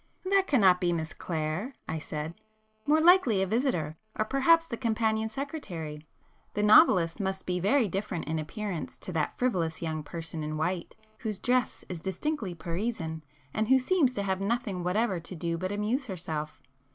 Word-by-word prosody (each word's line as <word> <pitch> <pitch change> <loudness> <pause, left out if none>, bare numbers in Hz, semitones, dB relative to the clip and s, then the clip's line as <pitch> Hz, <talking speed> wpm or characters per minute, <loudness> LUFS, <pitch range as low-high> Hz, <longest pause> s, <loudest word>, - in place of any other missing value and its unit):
"That 385 0 +3
cannot 195 -9 +5
be 175 -1 +2
Miss 160 -2 -2
Clare," 165 - -3
I 160 - -2
said—"More 215 - -3
likely 315 - +5
a - - +1
visitor,—or 215 - -1
perhaps 275 +7 +4
the 250 - -4
companion 220 -2 0
secretary. 175 - -6 0.5
The 210 - +1
novelist 210 - +6
must 190 -1 -2
be 180 0 -1
very 220 +6 +3
different 190 -2 -3
in 160 0 -1
appearance 185 +2 -4
to - - -6
that 160 -3 -1
frivolous 175 -10 0
young 160 -2 -2
person 165 +1 -6
in 155 0 -3
white, 175 +2 -2 0.2
whose 215 -4 -3
dress 250 +3 0
is 180 -3 -5
distinctly 190 - -2
Parisian, 165 -1 -3 0.3
and 220 0 0
who 265 - +6
seems 265 -1 +2
to 200 - -1
have 190 -1 -1
nothing 205 -3 -1
whatever 190 +1 +1
to 170 +3 -9
do 170 0 -2
but 185 +3 -3
amuse 220 +6 -1
herself." 160 -5 -4
195 Hz, 165 wpm, -29 LUFS, 165-235 Hz, 0.5 s, novelist